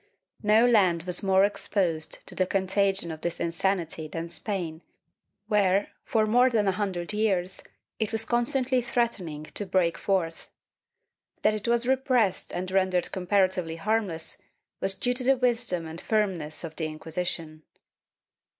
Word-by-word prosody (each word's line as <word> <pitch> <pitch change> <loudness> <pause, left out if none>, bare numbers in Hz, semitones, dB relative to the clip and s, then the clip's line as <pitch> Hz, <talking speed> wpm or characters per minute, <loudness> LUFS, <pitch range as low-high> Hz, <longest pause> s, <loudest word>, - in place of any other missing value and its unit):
No 215 +2 +5
land 190 -9 +4
was 180 0 -1
more 190 -1 +4
exposed 180 -5 -2
to - - -9
the 185 - 0
contagion 195 -2 +1
of 160 -1 -8
this 170 -1 -2
insanity 170 -2 -1
than 165 +2 -5
Spain 170 -4 -4 0.6
where, 205 -2 +2
for 220 -2 +1
more 245 +4 +4
than 215 -4 +1
a - - +4
hundred 185 -2 -3
years, 195 -4 0 0.4
it 220 -2 -1
was 225 0 0
constantly 250 +2 +2
threatening 230 -11 -1
to - - -3
break 185 -3 +1
forth. 175 -5 -1 0.9
That - - +4
it 215 +1 -4
was 235 0 +2
repressed 255 -7 +1
and 185 +1 -4
rendered 185 -2 +2
comparatively 185 -3 +1
harmless 195 -3 -1 0.4
was 195 0 0
due 245 +5 0
to 255 +1 -3
the 265 +1 +4
wisdom 240 -8 0
and 160 +1 -7
firmness 185 -9 -1
of 160 -1 -6
the 160 - -1
Inquisition. 155 0 -4
190 Hz, 145 wpm, -27 LUFS, 170-220 Hz, 0.9 s, No